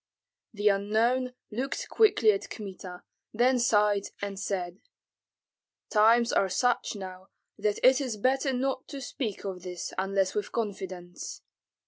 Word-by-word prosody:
The 210 Hz, -2 st, -1 dB
unknown 230 Hz, +6 st, +1 dB, 0.2 s
looked 255 Hz, +6 st, -3 dB
quickly 400 Hz, -, +4 dB
at 195 Hz, -, -3 dB
Kmita, 185 Hz, -3 st, -8 dB, 0.3 s
then 250 Hz, +2 st, +3 dB
sighed 210 Hz, -3 st, +3 dB
and 200 Hz, -1 st, -4 dB
said, 185 Hz, -2 st, -3 dB, 1.1 s
"Times 230 Hz, +2 st, +5 dB
are 195 Hz, -, +3 dB
such 240 Hz, +4 st, +1 dB
now 185 Hz, -1 st, -8 dB, 0.3 s
that 210 Hz, -1 st, 0 dB
it 260 Hz, +2 st, +6 dB
is 250 Hz, -6 st, -3 dB
better 265 Hz, +5 st, +1 dB
not 260 Hz, +1 st, -1 dB
to 280 Hz, -, -7 dB
speak 245 Hz, -5 st, -4 dB
of 185 Hz, -2 st, -4 dB
this 180 Hz, -1 st, -6 dB
unless 195 Hz, 0 st, +1 dB
with 210 Hz, -1 st, -3 dB
confidants." 190 Hz, -5 st, -5 dB
210 Hz, 130 wpm, -28 LUFS, 195-245 Hz, 1.1 s, it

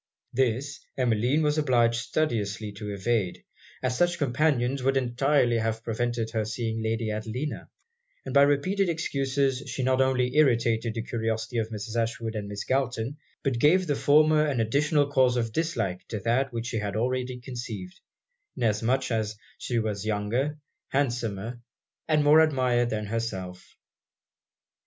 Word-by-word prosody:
This, 135 Hz, +3 st, 0 dB, 0.2 s
Emmeline 125 Hz, +4 st, +2 dB
was 150 Hz, +1 st, +2 dB
obliged 120 Hz, -5 st, +2 dB
studiously 110 Hz, -8 st, -1 dB
to 105 Hz, +1 st, -7 dB
evade, 100 Hz, -1 st, -1 dB, 0.4 s
as 130 Hz, -1 st, 0 dB
such 175 Hz, +3 st, +2 dB
companions 135 Hz, -2 st, +1 dB
would 135 Hz, +1 st, +2 dB
entirely 125 Hz, -1 st, +2 dB
have 110 Hz, 0 st, -2 dB
prevented 115 Hz, 0 st, -2 dB
her 110 Hz, -1 st, 0 dB
seeing 110 Hz, +1 st, -3 dB
Lady 110 Hz, 0 st, -1 dB
Adelina; 110 Hz, +7 st, -4 dB, 0.6 s
and -, -, -5 dB
by 140 Hz, -, +6 dB
repeated 175 Hz, +8 st, +2 dB
excuses 140 Hz, -4 st, 0 dB
she 130 Hz, -, -3 dB
not 130 Hz, +1 st, +3 dB
only 130 Hz, 0 st, +1 dB
irritated 115 Hz, -5 st, +3 dB
the 115 Hz, -, -2 dB
curiosity 115 Hz, 0 st, -2 dB
of 110 Hz, 0 st, -2 dB
Mrs. 110 Hz, +1 st, -6 dB
Ashwood 115 Hz, 0 st, -3 dB
and 105 Hz, -1 st, -4 dB
Miss 100 Hz, 0 st, -5 dB
Galton, 130 Hz, 0 st, -1 dB, 0.3 s
but 135 Hz, -5 st, 0 dB
gave 180 Hz, +8 st, +4 dB
the 145 Hz, -4 st, 0 dB
former 155 Hz, +2 st, +4 dB
an 145 Hz, -5 st, 0 dB
additional 145 Hz, +6 st, +2 dB
cause 130 Hz, -3 st, +3 dB
of 115 Hz, -2 st, -1 dB
dislike 155 Hz, -, -1 dB
to 110 Hz, -, -4 dB
that 130 Hz, +5 st, +1 dB
which 115 Hz, -1 st, -4 dB
she 120 Hz, -1 st, -3 dB
had 105 Hz, -1 st, -3 dB
already 125 Hz, +2 st, -1 dB
conceived; 120 Hz, -7 st, -7 dB, 0.6 s
inasmuch 120 Hz, +4 st, +1 dB
as 110 Hz, -2 st, -1 dB, 0.2 s
she 120 Hz, -, -2 dB
was 105 Hz, -3 st, -1 dB
younger, 110 Hz, +8 st, -1 dB, 0.3 s
handsomer, 120 Hz, -4 st, -2 dB, 0.5 s
and 155 Hz, -2 st, +3 dB
more 150 Hz, +2 st, +7 dB
admired 130 Hz, -6 st, +3 dB
than 105 Hz, -2 st, -2 dB
herself. 95 Hz, -5 st, -5 dB
120 Hz, 145 wpm, -27 LUFS, 110-140 Hz, 0.6 s, more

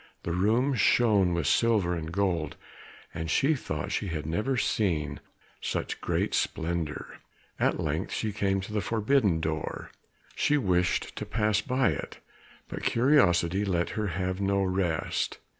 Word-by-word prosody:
The 85 Hz, -, -3 dB
rooms 115 Hz, +9 st, +2 dB
shone 105 Hz, -5 st, +4 dB
with 85 Hz, -3 st, -1 dB
silver 105 Hz, -, +3 dB
and 80 Hz, -2 st, -4 dB
gold, 85 Hz, -5 st, -1 dB, 0.6 s
and 80 Hz, 0 st, -4 dB
she 140 Hz, -, +3 dB
thought 75 Hz, -, -4 dB
she 105 Hz, -, -1 dB
had 80 Hz, -4 st, -4 dB
never 105 Hz, -, -1 dB
seen 75 Hz, -12 st, 0 dB, 0.4 s
such -, -, -3 dB
great -, -, -1 dB
splendour. 80 Hz, -2 st, -2 dB, 0.4 s
At -, -, +1 dB
length 80 Hz, +2 st, -2 dB
she 110 Hz, -2 st, -2 dB
came 95 Hz, -2 st, 0 dB
to 100 Hz, +3 st, -8 dB
the 105 Hz, -, 0 dB
forbidden 110 Hz, -5 st, +2 dB
door; 80 Hz, -1 st, -4 dB, 0.4 s
she 150 Hz, -, +2 dB
wished 90 Hz, -8 st, 0 dB
to -, -, -3 dB
pass 105 Hz, -1 st, +1 dB
it -, -, -7 dB
by, 130 Hz, -1 st, +1 dB, 0.6 s
but -, -, -6 dB
curiosity 100 Hz, -, +3 dB
let 90 Hz, -4 st, 0 dB
her 110 Hz, -1 st, -2 dB
have 95 Hz, +1 st, -2 dB
no 100 Hz, 0 st, +1 dB
rest. 90 Hz, -4 st, -1 dB
95 Hz, 145 wpm, -28 LUFS, 85-110 Hz, 0.6 s, shone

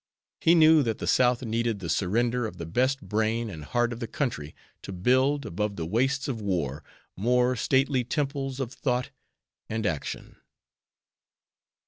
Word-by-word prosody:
He 170 Hz, -, +5 dB
knew 160 Hz, -1 st, +7 dB
that 115 Hz, -5 st, -1 dB
the -, -, -5 dB
South 125 Hz, 0 st, +3 dB
needed 115 Hz, -1 st, -1 dB
the 95 Hz, -4 st, -6 dB
surrender 115 Hz, +8 st, 0 dB
of 90 Hz, -, -10 dB
the 85 Hz, -, -5 dB
best 130 Hz, +10 st, 0 dB
brain 110 Hz, +3 st, -1 dB
and 80 Hz, -4 st, -8 dB
heart 120 Hz, +7 st, 0 dB
of 115 Hz, -, -8 dB
the 115 Hz, -, -4 dB
country 110 Hz, -, -3 dB, 0.3 s
to -, -, -8 dB
build, 130 Hz, +9 st, +2 dB
above 105 Hz, +1 st, -2 dB
the 80 Hz, -, -4 dB
wastes 135 Hz, -, 0 dB
of 120 Hz, -5 st, -3 dB
war, 80 Hz, -8 st, -2 dB, 0.3 s
more 125 Hz, +4 st, +2 dB
stately 130 Hz, +2 st, +2 dB
temples 135 Hz, 0 st, -2 dB
of 130 Hz, -2 st, -3 dB
thought 125 Hz, -2 st, -1 dB, 0.6 s
and 110 Hz, 0 st, -2 dB
action. 80 Hz, -8 st, -4 dB
120 Hz, 155 wpm, -27 LUFS, 100-130 Hz, 0.6 s, knew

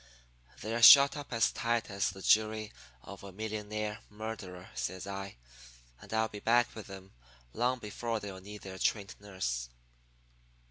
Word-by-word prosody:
"'They're 115 Hz, +3 st, -2 dB
shut 140 Hz, +4 st, +10 dB
up 145 Hz, -1 st, -8 dB
as 115 Hz, -1 st, +2 dB
tight 115 Hz, 0 st, -1 dB
as 100 Hz, 0 st, 0 dB
the 95 Hz, +1 st, -10 dB
jury 110 Hz, 0 st, +2 dB, 0.3 s
of 100 Hz, -1 st, -10 dB
a 100 Hz, -, -9 dB
millionaire 105 Hz, +1 st, -4 dB
murderer,' 105 Hz, -4 st, -7 dB
says 80 Hz, +10 st, -4 dB
I. 100 Hz, 0 st, -6 dB, 0.7 s
'And -, -, -13 dB
I'll 110 Hz, 0 st, +1 dB
be 105 Hz, -1 st, -9 dB
back 120 Hz, +3 st, +3 dB
with 110 Hz, -, -9 dB
them 95 Hz, -1 st, -11 dB, 0.4 s
long 125 Hz, +3 st, +1 dB
before 115 Hz, 0 st, -4 dB
they'll 100 Hz, -2 st, -8 dB
need 105 Hz, +2 st, -10 dB
their 95 Hz, -1 st, -8 dB
trained 100 Hz, -3 st, 0 dB
nurse.' 75 Hz, -13 st, -3 dB
105 Hz, 150 wpm, -31 LUFS, 95-110 Hz, 0.7 s, shut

